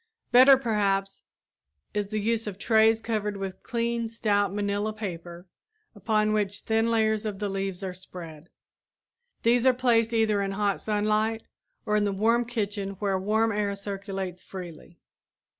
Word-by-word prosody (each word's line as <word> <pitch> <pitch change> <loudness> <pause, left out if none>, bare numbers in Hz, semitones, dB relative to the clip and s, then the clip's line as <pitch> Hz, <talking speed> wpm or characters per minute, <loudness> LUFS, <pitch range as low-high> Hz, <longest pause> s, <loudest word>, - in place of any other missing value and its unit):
Better, 260 +3 +8
perhaps, 200 -5 0 0.7
is 205 -1 -1
the 215 +1 -3
use 225 +1 -1
of 195 -2 -5
trays 220 +1 +3
covered 210 -3 -2
with 190 -1 -6
clean, 235 -1 -2
stout 205 -3 0
manilla 205 +1 -1
paper 175 -4 -7 0.5
upon 215 0 +1
which 205 -1 -1
thin 225 +1 +1
layers 220 -1 +1
of 210 -3 -4
the 205 +1 -2
leaves 195 -1 -3
are 185 -1 -3
spread. 175 -3 -10 0.9
These 235 +1 +3
are 255 - +5
placed 235 -3 +2
either 220 -3 +2
in 195 0 -2
hot 200 0 0
sunlight 215 +1 0 0.4
or 210 -1 +1
in 210 -1 +2
the 200 - 0
warm 230 +5 +2
kitchen 205 -4 -3
where 195 -1 0
warm 220 +3 +1
air 205 -1 -1
circulates 195 -2 -5
freely. 175 -2 -10
210 Hz, 150 wpm, -27 LUFS, 195-225 Hz, 0.9 s, Better